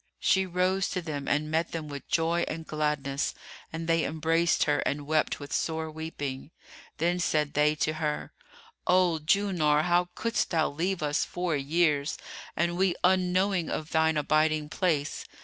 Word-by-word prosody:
She 190 0 +2
rose 185 +2 +1
to 180 - -2
them 145 -4 -4
and 150 +1 0
met 165 +2 0
them 160 -2 -4
with 140 -2 -8
joy 170 +1 +2
and 160 +1 -5
gladness, 150 -3 -1 0.4
and 165 0 -4
they 165 -1 +3
embraced 165 +2 +2
her 145 -1 +1
and 145 0 -2
wept 155 +1 +1
with 145 -1 -7
sore 160 -1 -1
weeping. 145 -4 -5 0.5
Then 175 +2 +1
said 150 -4 +1
they 150 +1 +3
to 155 +1 0
her, 150 -1 -2 0.5
"O 180 -3 +3
Julnar, 160 -5 +2
how 175 +1 +2
couldst 230 0 0
thou 160 -3 +1
leave 170 +3 -1
us 145 0 +1
four 175 -3 -2
years, 145 0 +1 0.4
and 170 +1 0
we 185 -1 +2
unknowing 185 0 +2
of 155 0 -4
thine 160 0 +3
abiding 155 0 +1
place? 155 -4 -1
160 Hz, 160 wpm, -28 LUFS, 150-175 Hz, 0.5 s, they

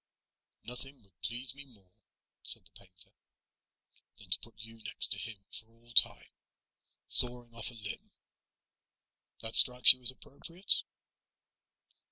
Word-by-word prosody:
"Nothing 130 +1 -12
would 95 -3 -25
please 120 +1 -6
me 140 +1 -13
more," 105 -9 -24 0.5
said - - +4
the - - -19
painter, 90 -2 -13 1.1
"than - - -14
to - - 0
put 115 -2 -17
you 115 0 -14
next 105 - +1
to - - -4
him 115 -3 -10 0.2
for 110 - -10
all 115 +1 -19
time. - - +2 0.8
Sawing 120 -1 +1
off 115 -1 -8
a 120 - -12
limb 105 -2 -10 1.3
that 110 0 -4
strikes 125 0 +7
you 130 - -20
as 125 - +4
appropriate?" 165 +8 -2
115 Hz, 135 wpm, -29 LUFS, 110-125 Hz, 1.3 s, strikes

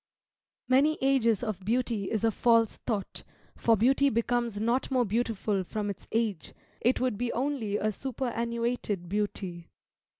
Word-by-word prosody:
Many 280 +4 +4
ages 250 -5 +2
of 210 -5 -3
beauty 225 -2 0
is 220 -1 -1
a 225 - +4
false 230 0 +3
thought, 210 -5 -2 0.3
for 230 -1 +3
beauty 270 +6 +4
becomes 235 -2 0
not 235 +4 0
more 255 -2 +2
beautiful 215 -2 0
from 205 +2 -3
its 195 - -11
age; 220 -7 -1 0.2
it 245 +3 +2
would 250 -5 -1
be 245 -1 -1
only 250 -6 -1
a 215 +1 0
superannuated 235 -5 -2
beauty. 190 -3 -3
230 Hz, 140 wpm, -29 LUFS, 210-245 Hz, 0.3 s, Many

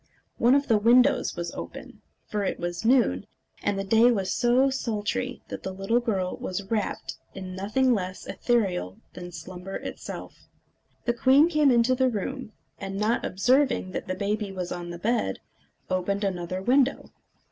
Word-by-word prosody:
One 245 +3 +5
of 280 0 +1
the 220 -3 +4
windows 245 +5 +4
was 170 -1 -4
open, - - -9 0.2
for 210 -1 -2
it 190 - -2
was 175 +2 -3
noon, 245 +2 +3 0.3
and 205 -1 0
the 195 - -1
day 225 +5 +5
was 195 -6 0
so 250 +3 +3
sultry 245 0 -2
that - - -6
the 190 - -4
little 195 +5 +1
girl 195 -6 -1
was 185 +2 -4
wrapped 215 -3 -2 0.2
in 185 -1 -6
nothing 230 +7 +2
less 185 -3 -3
ethereal 190 - 0 0.2
than 175 0 -8
slumber 180 +3 -8
itself. - - -7 0.6
The 240 - +2
queen 270 +6 +5
came 305 -4 +4
into 240 0 +4
the 260 0 +2
room, 245 +2 -4 0.3
and 195 0 -5
not 215 +3 +1
observing 250 +1 +2
that - - -5
the 185 - -2
baby 205 +1 -2
was 180 -2 -5
on 175 -1 -5
the 175 - -6
bed, 190 - 0 0.5
opened 190 +2 -1
another 185 -1 -2
window. 265 +4 +2
210 Hz, 165 wpm, -26 LUFS, 185-245 Hz, 0.6 s, One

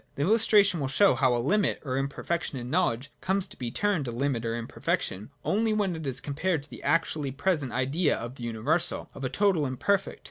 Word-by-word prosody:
This 145 +3 0
illustration 205 -4 +4
will 140 - -1
show 190 +8 +4
how 130 -1 +2
a - - +1
limit 195 - +1
or 130 - -2
imperfec 140 +5 -2
tion 135 - -5
in 125 0 -6
knowledge 140 -5 0
comes 190 0 0
to - - -10
be 120 - -4
termed 180 - 0
a - - -2
limit 120 -1 -1
or 115 +1 -2
imper 115 - -9
fection, 95 +3 -1 0.2
only 220 +1 +2
when 200 -5 0
it 160 -3 -5
is 130 -1 -2
compared 155 +5 -1
with 145 - -14
the - - -9
actually 150 -1 +1
present 145 -1 0
Idea 140 +7 +1
of 120 +2 -6
the 125 - -10
universal, 120 +9 0
of 135 - -9
a 130 - -1
total 195 -4 +2
and 130 -3 -3
perfect. 200 -1 0
145 Hz, 225 wpm, -28 LUFS, 125-185 Hz, 0.2 s, illustration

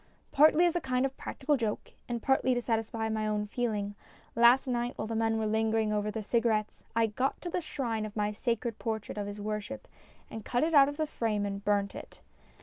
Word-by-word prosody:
Partly 310 +4 +6
as 345 0 +2
a 350 - +1
kind 255 -1 0
of 270 0 -3
practical 290 +1 -1
joke, 220 -4 -3 0.2
and 235 -2 -3
partly 265 -1 +3
to 245 - 0
satisfy 225 -1 -1
my 220 -1 -1
own 210 0 0
feeling, 210 -2 -2 0.4
last 235 +3 +6
night, 245 -1 -2
while - - -3
the 225 - -4
men 225 0 +1
were 220 - -1
still 215 - 0
lingering 220 0 +1
over 210 0 0
the 215 0 -4
cigarettes, 220 -1 0
I 230 0 +4
got 250 +5 -1
to 350 - -5
the 360 - -1
shrine 245 -8 -3
of 215 -1 -6
my 210 -1 0
sacred 230 +1 -2
portrait 220 -2 -3
of 205 - -3
his 205 0 -6
worship, 210 +5 -4 0.4
and 220 - -8
cut 245 +6 0
it 325 +1 0
out 280 -2 +7
of 290 - -7
the 310 - +1
frame 220 -8 -1
and 200 0 -4
burnt 205 -1 +1
it. - - -10
225 Hz, 225 wpm, -30 LUFS, 215-255 Hz, 0.4 s, out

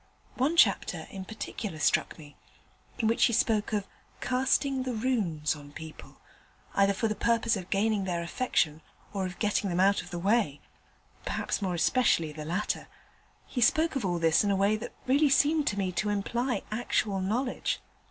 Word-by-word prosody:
One 290 +7 0
chapter - - +3
in 190 -1 -7
particular 210 -3 -6
struck 150 - +1
me, 145 -2 -13 0.6
in 225 - +1
which 230 - +4
he 235 - +1
spoke 220 -1 +1
of 205 -2 -1 0.3
"casting 265 +1 +1
the 255 -1 -3
Runes" 200 - 0
on 145 -1 -13
people, 160 0 -10 0.6
either 200 0 +3
for 225 - 0
the 215 - 0
purpose 230 +1 +1
of 185 -2 -6
gaining 205 0 +1
their 175 -2 -2
affection 170 -5 0 0.3
or 195 -2 -1
of 180 - -9
getting 205 -2 0
them 175 0 -1
out 195 +2 +4
of - - -12
the 175 - -5
way 195 -5 +1 0.6
perhaps - - -2
more 185 -3 -1
especially 170 -3 +2
the 150 0 -7
latter: 180 +7 -2 0.6
he 245 - -4
spoke 315 +6 +3
of 270 - -1
all 175 -2 0
this 165 +1 +3
in 205 - +1
a 200 - +2
way 200 +2 +3
that 215 +2 -6
really 280 +3 +4
seemed 295 +2 +3
to 205 - 0
me 190 -2 0
to 210 +4 -1
imply 235 +5 -1
actual 215 -3 0
knowledge. 240 +7 -1
205 Hz, 180 wpm, -29 LUFS, 180-240 Hz, 0.6 s, which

